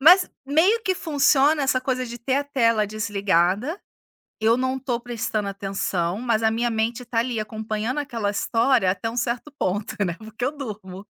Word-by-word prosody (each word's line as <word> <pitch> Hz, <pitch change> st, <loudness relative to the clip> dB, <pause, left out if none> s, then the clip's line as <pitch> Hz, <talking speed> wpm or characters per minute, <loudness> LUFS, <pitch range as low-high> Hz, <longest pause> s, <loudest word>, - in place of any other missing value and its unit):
mas 355 Hz, +6 st, +7 dB, 0.2 s
meio 355 Hz, +11 st, +3 dB
que 380 Hz, -3 st, +1 dB
funciona 290 Hz, -2 st, +3 dB
essa 255 Hz, -1 st, +2 dB
coisa 255 Hz, -1 st, -1 dB
de 240 Hz, 0 st, -7 dB
ter 260 Hz, +3 st, -1 dB
a 285 Hz, -, 0 dB
tela 230 Hz, -6 st, +2 dB
desligada, 205 Hz, -, 0 dB, 0.6 s
eu 225 Hz, +2 st, +3 dB
não 260 Hz, +1 st, -1 dB
tô 245 Hz, -3 st, -2 dB
prestando 225 Hz, -3 st, -3 dB
atenção, 195 Hz, -2 st, -2 dB
mas 230 Hz, -2 st, +1 dB
a 220 Hz, -, +4 dB
minha 235 Hz, +2 st, 0 dB
mente 230 Hz, +2 st, -1 dB
tá 230 Hz, -, 0 dB
ali, 235 Hz, -1 st, -1 dB
acompanhando 220 Hz, +4 st, -3 dB
aquela 235 Hz, -8 st, -2 dB
história 230 Hz, 0 st, +2 dB
até 200 Hz, +4 st, -1 dB
um 230 Hz, -, -7 dB
certo 240 Hz, +5 st, -2 dB
ponto 205 Hz, +4 st, -1 dB
né, 175 Hz, -3 st, -1 dB
porque 220 Hz, +2 st, -5 dB
eu 265 Hz, -, +1 dB
durmo. 205 Hz, -7 st, -7 dB
230 Hz, 175 wpm, -24 LUFS, 215-265 Hz, 0.6 s, mas